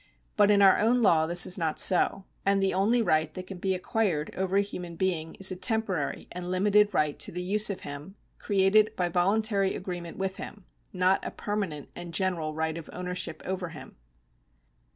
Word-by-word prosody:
But 205 0 +4
in 200 -1 +5
our 195 - +6
own 235 +3 +2
law 160 -5 +4
this 175 +1 +3
is 185 - 0
not 160 -2 -1
so, 190 +1 +4 0.2
and 200 0 +2
the 195 0 +1
only 225 +5 +2
right 155 -4 +1
that 185 - -6
can 185 -1 -9
be 190 +1 0
acquired 185 -5 -1
over 190 0 -2
a - - +5
human 180 -4 -7
being 165 -3 -2
is 195 0 0
a - - -3
temporary 190 -5 -1
and 180 0 -6
limited 205 +3 +3
right 150 -5 0
to 145 - -2
the 180 +1 -4
use 210 +3 +2
of 195 - -5
him, 145 +7 -8 0.2
created 205 +2 +2
by 180 -1 -1
voluntary 195 +3 +1
agreement 175 -3 -6
with 190 0 -3
him 205 -3 -9 0.2
— - - -41
not 185 +1 +1
a - - -3
permanent 195 -9 -4
and 175 -1 -7
general 170 -5 -1
right 160 +1 -2
of 165 - -12
ownership 180 -3 -4
over 185 -2 -3
him. 160 -2 -11
185 Hz, 195 wpm, -27 LUFS, 170-200 Hz, 0.2 s, our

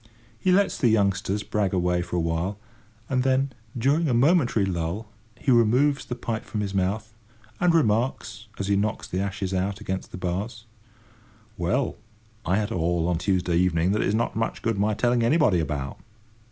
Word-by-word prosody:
He 185 - +2
lets 200 +2 +2
the 125 - +3
youngsters 100 -1 +1
brag 100 -3 -1
away 90 -1 +1
for 90 0 -5
a - - +2
while, 85 +4 -1 0.5
and 130 -1 +1
then, 135 +1 +1 0.2
during 145 +7 +2
a 120 - +2
momentary 125 - +3
lull, 90 +4 -3 0.3
he 135 - 0
removes 125 +5 +3
the 125 - -4
pipe 115 -2 -4
from 105 - -4
his 100 -1 -3
mouth, 100 +4 -1 0.5
and 180 -1 +4
remarks, 115 -6 0
as 100 - -2
he 100 0 +2
knocks 105 +2 -1
the 90 - -3
ashes 95 -1 -3
out 95 +1 -1
against 95 0 -4
the - - -8
bars: 100 +6 -4 0.9
"Well, 90 +7 -1 0.5
I 90 - +3
had 105 0 -1
a - - -1
haul 85 0 +1
on 90 -2 0
Tuesday 90 -2 +1
evening 90 0 +2
that 105 - +1
it's 100 - +1
not 120 +1 -1
much 115 +1 -2
good 115 -3 0
my 105 +1 +1
telling 120 +2 +2
anybody 115 - +3
about." 70 -4 -3
105 Hz, 180 wpm, -25 LUFS, 90-120 Hz, 0.9 s, and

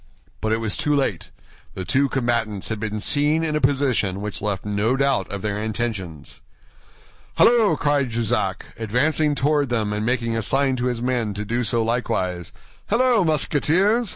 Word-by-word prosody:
But 110 - -1
it 110 - +2
was 110 -2 -3
too 150 0 +1
late. 130 - -1 0.5
The 95 - -5
two 140 +8 +2
combatants 115 -6 -1
had 110 -1 -3
been 105 0 -3
seen 150 +7 +1
in 155 -1 0
a 150 - 0
position 130 -8 +1
which 105 0 -5
left 100 -1 -3
no 105 +4 +1
doubt 140 0 +1
of 100 -1 -5
their 105 -1 -2
intentions. 105 - -4 0.9
"Halloo!" 230 -3 +4
cried 145 -3 +1
Jussac, 110 -4 -1
advancing 145 +7 +1
toward 145 0 +1
them 110 -4 -1
and 105 0 -2
making 115 -1 0
a 115 - 0
sign 135 +4 +1
to 125 +1 -1
his 120 -1 -2
men 120 -5 -1
to 105 +1 -4
do 120 +3 -1
so 115 +1 0
likewise, 90 -7 -2 0.4
"halloo, 235 -1 +3
Musketeers? 175 - +2
120 Hz, 170 wpm, -22 LUFS, 105-145 Hz, 0.9 s, Halloo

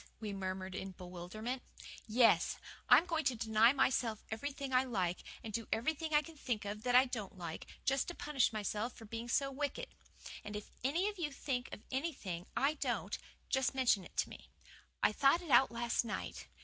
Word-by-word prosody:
we 215 -2 -4
murmured 190 -1 -3
in 190 0 -5
bewilderment. 185 +8 -5 0.5
"Yes. 230 +1 +4 0.3
I'm 335 - +8
going 325 -3 0
to 260 -3 +3
deny 220 +1 +5
myself 250 -5 +1
everything 275 +3 -4
I 255 +1 +5
like, 185 -8 -1 0.2
and 220 - -6
do 230 0 -2
everything 315 +7 0
I 300 0 +5
can 330 0 -11
think 240 -8 -2
of 205 +1 -4
that 245 +1 +1
I 255 +1 +8
don't 220 -7 -5
like, 170 -3 -6 0.2
just 270 0 +2
to 350 - -5
punish 280 -6 +2
myself 215 +2 -2
for 225 - -12
being 230 +2 -5
so 275 +3 +2
wicked. 290 - -3 0.5
And 205 0 -6
if 210 - -6
any 330 +9 +2
of 415 -2 -4
you 300 -4 -1
think 265 -2 -2
of - - -8
anything 255 - -3
I 280 +3 +3
don't, 305 - -1 0.3
just 265 0 +1
mention 245 -7 +3
it - - -14
to - - +1
me. - - -12 0.5
I - - +6
thought 275 +10 +4
it 325 - -6
out 265 - +7
last 235 +1 0
night. 90 - -5
240 Hz, 190 wpm, -35 LUFS, 210-275 Hz, 0.5 s, I'm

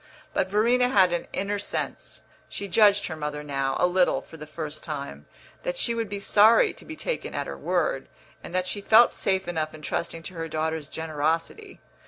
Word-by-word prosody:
But 190 - +1
Verena 240 +5 +3
had 190 -6 +4
an 175 - -2
inner 205 +1 -2
sense 205 - -5 0.3
(she 200 - -5
judged 205 +2 +4
her 160 - -4
mother 150 -1 -4
now, 135 -2 -1
a - - +4
little, 180 0 +3
for - - -14
the 150 -1 -9
first 155 -1 -6
time) 145 -3 -6 0.3
that - - -3
she 235 - +2
would 230 -2 -2
be 200 - -3
sorry 215 +3 +5
to - - -14
be 315 - -7
taken - - -4
at - - -2
her - - -6
word, - - -1 0.3
and - - -8
that 185 0 +1
she 205 +2 -3
felt 225 +4 +6
safe 190 -1 0
enough 155 -3 -2
in 155 - -13
trusting 165 +2 -3
to 185 - -7
her 165 -1 -4
daughter's 160 -1 -2
generosity. 160 - -3
180 Hz, 200 wpm, -26 LUFS, 155-205 Hz, 0.3 s, felt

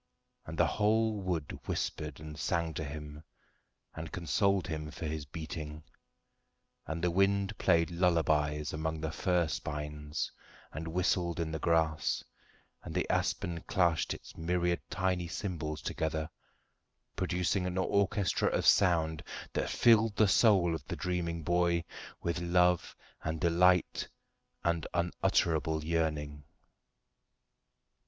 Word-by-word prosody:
And 80 +1 -6
the 85 - +5
whole 110 +4 +2
wood 85 -6 -3
whispered 75 -2 -3
and 75 0 -8
sang 80 +2 -1
to 80 - -3
him 75 0 -7 0.7
and 80 0 -7
consoled 95 +3 +1
him 75 -3 -4
for 80 +2 -7
his 80 -1 -3
beating, 75 0 -6 1.0
and 80 +1 -4
the 90 - +2
wind 100 +3 +2
played 85 -3 +3
lullabies 80 -4 +1
among 80 0 -2
the 80 -1 -2
fir 90 +2 +1
spines 75 0 -4 0.4
and 80 +3 -6
whistled 85 0 0
in 80 -1 -1
the 80 - -3
grass, 80 -1 +1 0.6
and - - -8
the - - 0
aspen 85 -1 -1
clashed 85 -6 +2
its - - -7
myriad 85 +1 0
tiny 90 -2 0
cymbals 80 -4 -4
together, 80 0 -2 0.8
producing 90 0 0
an 90 0 -3
orchestra 100 -1 +2
of - - 0
sound 80 -4 +4 0.3
that - - -1
filled 115 -2 +4
the 110 - +5
soul 95 -4 +5
of 80 - -4
the - - -3
dreaming 85 -2 -2
boy 85 0 +2 0.4
with 85 0 -1
love 90 0 +2 0.3
and 80 0 -2
delight 90 +1 +3 0.6
and 85 -1 0
unutterable 80 -2 +1
yearning. 75 -3 -1
85 Hz, 125 wpm, -32 LUFS, 80-90 Hz, 1.0 s, the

